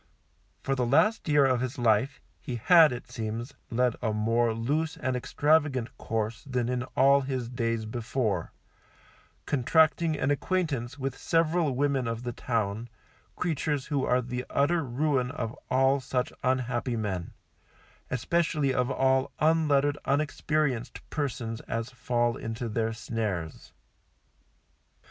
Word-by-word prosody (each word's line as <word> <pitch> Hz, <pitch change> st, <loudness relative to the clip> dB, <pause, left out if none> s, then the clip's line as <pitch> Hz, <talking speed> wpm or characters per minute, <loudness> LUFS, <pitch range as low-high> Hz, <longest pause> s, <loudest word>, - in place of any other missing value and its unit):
For 135 Hz, -, 0 dB
the 130 Hz, -2 st, 0 dB
last 210 Hz, -, +3 dB
year 145 Hz, -2 st, +5 dB
of 130 Hz, -2 st, +2 dB
his 130 Hz, +1 st, -3 dB
life, 120 Hz, +2 st, +2 dB, 0.2 s
he 125 Hz, -, -4 dB
had, 160 Hz, +5 st, +6 dB
it 125 Hz, -1 st, -6 dB
seems, 115 Hz, +3 st, -4 dB, 0.2 s
led 125 Hz, 0 st, +1 dB
a 110 Hz, -, 0 dB
more 115 Hz, +2 st, +1 dB
loose 145 Hz, +9 st, -1 dB
and 130 Hz, 0 st, -1 dB
extravagant 145 Hz, -1 st, +1 dB
course 110 Hz, 0 st, -3 dB
than 125 Hz, -2 st, 0 dB
in 125 Hz, -1 st, -1 dB, 0.2 s
all 140 Hz, +1 st, +6 dB
his 130 Hz, -3 st, -3 dB
days 115 Hz, -2 st, -1 dB
before, 110 Hz, -5 st, -2 dB, 0.9 s
contracting 155 Hz, +3 st, +3 dB
an 140 Hz, -, +1 dB
acquaintance 145 Hz, -6 st, -1 dB
with 135 Hz, -1 st, -3 dB
several 165 Hz, -3 st, +1 dB
women 135 Hz, -2 st, +1 dB
of 115 Hz, +1 st, -3 dB
the 120 Hz, -, -3 dB
town, 115 Hz, -1 st, -2 dB, 0.5 s
creatures 150 Hz, -4 st, -1 dB
who 145 Hz, -3 st, -1 dB
are 125 Hz, 0 st, +2 dB
the 125 Hz, +1 st, -4 dB
utter 150 Hz, +4 st, +2 dB
ruin 130 Hz, 0 st, 0 dB
of 125 Hz, -5 st, -4 dB, 0.2 s
all 135 Hz, +2 st, +3 dB
such 130 Hz, -1 st, -2 dB
unhappy 125 Hz, -1 st, 0 dB
men, 95 Hz, -5 st, -3 dB, 0.8 s
especially 150 Hz, 0 st, +1 dB
of 125 Hz, 0 st, +1 dB
all 130 Hz, 0 st, +2 dB
unlettered 145 Hz, -2 st, +2 dB
unexperienced 145 Hz, -3 st, -1 dB
persons 120 Hz, -6 st, -3 dB
as 115 Hz, +1 st, -3 dB
fall 120 Hz, -1 st, 0 dB
into 115 Hz, +1 st, -4 dB
their 110 Hz, 0 st, -1 dB
snares. 105 Hz, -7 st, -4 dB
125 Hz, 130 wpm, -28 LUFS, 115-145 Hz, 0.9 s, had